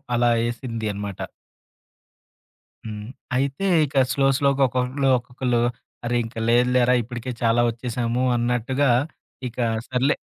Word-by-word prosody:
అలా 120 Hz, 0 st, +3 dB, 0.2 s
ఏసింది 115 Hz, -2 st, -4 dB
అనమాట. 100 Hz, -1 st, -6 dB, 1.7 s
హ్మ్. 105 Hz, -1 st, -6 dB, 0.3 s
అయితే 140 Hz, +7 st, 0 dB, 0.2 s
ఇక 140 Hz, -1 st, -6 dB, 0.2 s
స్లో, 135 Hz, -1 st, +2 dB
స్లోగా 140 Hz, -1 st, +2 dB
ఒక్కొక్కళ్లు 130 Hz, +2 st, 0 dB
ఒక్కొక్కళ్ళు, 125 Hz, 0 st, -1 dB, 0.4 s
"అరే! 120 Hz, +1 st, 0 dB
ఇంక 115 Hz, +1 st, -10 dB
లేదులేరా, 125 Hz, +1 st, +4 dB
ఇప్పటికే 120 Hz, +2 st, -6 dB
చాలా 115 Hz, 0 st, +3 dB
ఒచ్చేశాము" 120 Hz, +1 st, -2 dB
అన్నట్టుగా, 125 Hz, +3 st, +1 dB, 0.6 s
ఇక 120 Hz, -, -15 dB, 0.3 s
సర్లే 130 Hz, +3 st, +2 dB
125 Hz, 110 wpm, -23 LUFS, 115-130 Hz, 1.7 s, లేదులేరా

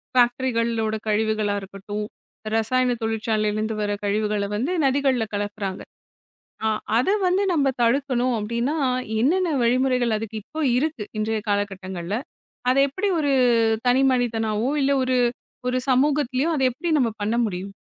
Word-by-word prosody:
ஃபேக்ட்ரிகளோட 235 Hz, -3 st, +1 dB
கழிவுகளா 215 Hz, -1 st, +1 dB
இருக்கட்டும், 200 Hz, +2 st, -6 dB, 0.5 s
ரசாயன 245 Hz, +2 st, +2 dB
தொழிற்சாலையிலேருந்து 215 Hz, -1 st, -1 dB
வர 205 Hz, -, -1 dB
கழிவுகள 210 Hz, 0 st, 0 dB
வந்து 260 Hz, +12 st, -1 dB
நதிகள்ல 265 Hz, -3 st, +2 dB
கலக்குறாங்க. 205 Hz, -1 st, -3 dB, 0.8 s
ஆ -, -, +2 dB, 0.3 s
அத 250 Hz, -, +1 dB, 0.2 s
வந்து 370 Hz, +3 st, +2 dB
நம்ம 285 Hz, -3 st, +2 dB, 0.2 s
தடுக்கணும், 255 Hz, 0 st, +1 dB
அப்டின்னா 235 Hz, +8 st, -1 dB, 0.4 s
என்னென்ன 340 Hz, +5 st, +2 dB
வழிமுறைகள் 250 Hz, -1 st, +2 dB
அதுக்கு 220 Hz, 0 st, -5 dB
இப்போ 315 Hz, +6 st, -7 dB, 0.2 s
இருக்கு, 295 Hz, -7 st, -2 dB
இன்றைய 215 Hz, 0 st, -1 dB
காலகட்டங்கள்ல. 195 Hz, -2 st, -2 dB, 0.5 s
அதை 260 Hz, +2 st, +3 dB
எப்பிடி 380 Hz, +9 st, -2 dB
ஒரு 285 Hz, -2 st, +1 dB, 0.6 s
தனி 255 Hz, +2 st, +4 dB
மனிதனாவோ, 225 Hz, -1 st, 0 dB
இல்ல 275 Hz, +1 st, +2 dB
ஒரு 255 Hz, 0 st, +1 dB, 0.5 s
ஒரு 255 Hz, -, 0 dB
சமூகத்திலேயும் 275 Hz, +2 st, +2 dB
அத 280 Hz, -, -1 dB
எப்பிடி 335 Hz, +8 st, -4 dB
நம்ம 245 Hz, -5 st, +2 dB
பண்ண 215 Hz, +3 st, 0 dB
முடியும்? 195 Hz, 0 st, -5 dB
235 Hz, 125 wpm, -23 LUFS, 210-260 Hz, 0.8 s, தனி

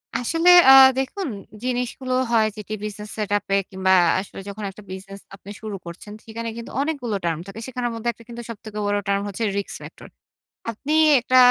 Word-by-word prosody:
আসলে 330 Hz, +8 st, +2 dB, 0.2 s
আ -, -, +11 dB, 0.3 s
দেখুন 365 Hz, +8 st, -3 dB, 0.4 s
জিনিসগুলো 250 Hz, +1 st, -2 dB, 0.2 s
হয় 220 Hz, -2 st, +4 dB
যেটি 210 Hz, +1 st, -6 dB
বিজনেস 210 Hz, 0 st, -6 dB
সেটআপে 205 Hz, -2 st, 0 dB
কিংবা 190 Hz, -1 st, 0 dB, 0.3 s
আসলে 195 Hz, -, -8 dB
যখন 210 Hz, +1 st, -7 dB
একটা 210 Hz, +2 st, -14 dB
বিজনেস 195 Hz, +1 st, -8 dB, 0.2 s
আপনি 200 Hz, +1 st, -12 dB
শুরু 215 Hz, -2 st, -5 dB
করছেন 180 Hz, +5 st, -9 dB
সেখানে 230 Hz, +1 st, -5 dB
কিন্তু 235 Hz, -, -8 dB
অনেকগুলো 280 Hz, -8 st, -2 dB
টার্ম 165 Hz, -2 st, -1 dB
থাকে। 195 Hz, +3 st, -8 dB
সেখানের 250 Hz, -2 st, -3 dB
মধ্যে 235 Hz, +1 st, -2 dB
একটা 230 Hz, -, -17 dB
কিন্তু 240 Hz, 0 st, -7 dB
সবথেকে 215 Hz, -1 st, -7 dB
বড় 205 Hz, 0 st, +1 dB
টার্ম 200 Hz, 0 st, +1 dB
হচ্ছে 205 Hz, +3 st, -4 dB
risk 200 Hz, -, -3 dB
factor. -, -, -11 dB, 0.6 s
আপনি 280 Hz, +7 st, -4 dB, 0.3 s
একটা 255 Hz, +2 st, +2 dB
215 Hz, 170 wpm, -23 LUFS, 200-245 Hz, 0.6 s, আ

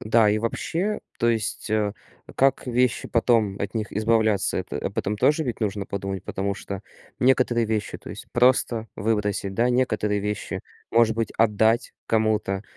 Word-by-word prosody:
Да, 110 Hz, -1 st, +4 dB
и 105 Hz, -, +2 dB
вообще, 170 Hz, -, -2 dB, 0.2 s
то 120 Hz, -, +2 dB
есть, 110 Hz, -3 st, -1 dB
э, 105 Hz, -1 st, +1 dB, 0.4 s
как 135 Hz, 0 st, +2 dB
вещи 125 Hz, 0 st, +1 dB
потом 115 Hz, -4 st, +2 dB
от 100 Hz, -, -3 dB
них 110 Hz, -2 st, -2 dB
избавляться, 110 Hz, -1 st, +2 dB
это -, -, -4 dB
об -, -, -4 dB
этом 105 Hz, +2 st, -1 dB
тоже 150 Hz, +9 st, +3 dB
ведь 120 Hz, -, -3 dB
нужно 100 Hz, -2 st, -2 dB
подумать, 95 Hz, -1 st, -4 dB
потому 100 Hz, +1 st, -2 dB
что 100 Hz, 0 st, -7 dB, 0.4 s
некоторые 125 Hz, -2 st, +3 dB
вещи- 105 Hz, -2 st, -2 dB
то -, -, -11 dB
есть -, -, -9 dB
просто 120 Hz, -2 st, +3 dB
выбросить, 105 Hz, -2 st, -1 dB
да. 120 Hz, +5 st, +2 dB
Некоторые 110 Hz, -5 st, +1 dB
вещи, 105 Hz, 0 st, -3 dB, 0.3 s
может 115 Hz, -1 st, +4 dB
быть, 115 Hz, -2 st, -1 dB
отдать 110 Hz, +1 st, +2 dB
кому-то, 110 Hz, -3 st, +1 dB
110 Hz, 160 wpm, -24 LUFS, 105-120 Hz, 0.4 s, Да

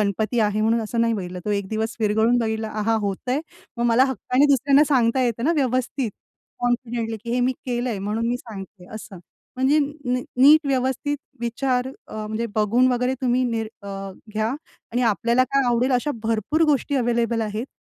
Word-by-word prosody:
गणपती 215 Hz, +3 st, 0 dB
आहे 210 Hz, 0 st, +1 dB
म्हणून 225 Hz, +2 st, +2 dB
असं 230 Hz, +2 st, -2 dB
नाही 230 Hz, -1 st, +2 dB
बघितलं 180 Hz, -2 st, -5 dB
तो 210 Hz, -, -2 dB
एक 190 Hz, -, -10 dB
दिवस 220 Hz, +1 st, -2 dB
विरगळून 220 Hz, +3 st, +3 dB
बघितला 220 Hz, -1 st, -1 dB
आहा 225 Hz, +2 st, +2 dB
होतंय, 250 Hz, +8 st, -2 dB, 0.4 s
मग 235 Hz, -, -1 dB
मला 235 Hz, +2 st, +5 dB
हक्काने 265 Hz, +1 st, +1 dB
दुसऱ्यांना 275 Hz, +3 st, +4 dB
सांगता 245 Hz, +1 st, +3 dB
येतं 235 Hz, -1 st, -1 dB
ना 325 Hz, -, +3 dB
व्यवस्थित 255 Hz, -2 st, 0 dB, 0.5 s
कॉन्फिडेंटली 240 Hz, -2 st, -1 dB
की 235 Hz, -, -4 dB
हे 250 Hz, -, +1 dB
मी 250 Hz, +1 st, +2 dB
केलंय 240 Hz, -3 st, -1 dB
म्हणून 210 Hz, +4 st, -2 dB
मी 245 Hz, -, 0 dB
सांगते 200 Hz, -6 st, -10 dB
असं. 205 Hz, -3 st, -9 dB, 0.4 s
म्हणजे 265 Hz, +4 st, +3 dB, 0.6 s
नीट 295 Hz, +3 st, +7 dB
व्यवस्थित 265 Hz, +2 st, 0 dB, 0.2 s
विचार 250 Hz, +2 st, 0 dB, 0.2 s
अ, -, -, -14 dB
म्हणजे 220 Hz, +2 st, -2 dB
बघून 220 Hz, +4 st, +3 dB
वगैरे 250 Hz, +1 st, 0 dB
तुम्ही 255 Hz, -1 st, +2 dB
निर 230 Hz, -2 st, -1 dB, 0.2 s
अ, -, -, -10 dB, 0.5 s
घ्या 215 Hz, +1 st, 0 dB, 0.4 s
आणि 245 Hz, +2 st, +1 dB
आपल्याला 235 Hz, +2 st, +2 dB
काय 275 Hz, +1 st, +1 dB
आवडेल 245 Hz, +2 st, +2 dB
अशा 250 Hz, +4 st, +1 dB
भरपूर 225 Hz, +8 st, 0 dB
गोष्टी 285 Hz, -1 st, +1 dB
अवेलेबल 235 Hz, -2 st, +1 dB
आहेत. 215 Hz, +3 st, -3 dB
235 Hz, 170 wpm, -23 LUFS, 220-255 Hz, 0.6 s, नीट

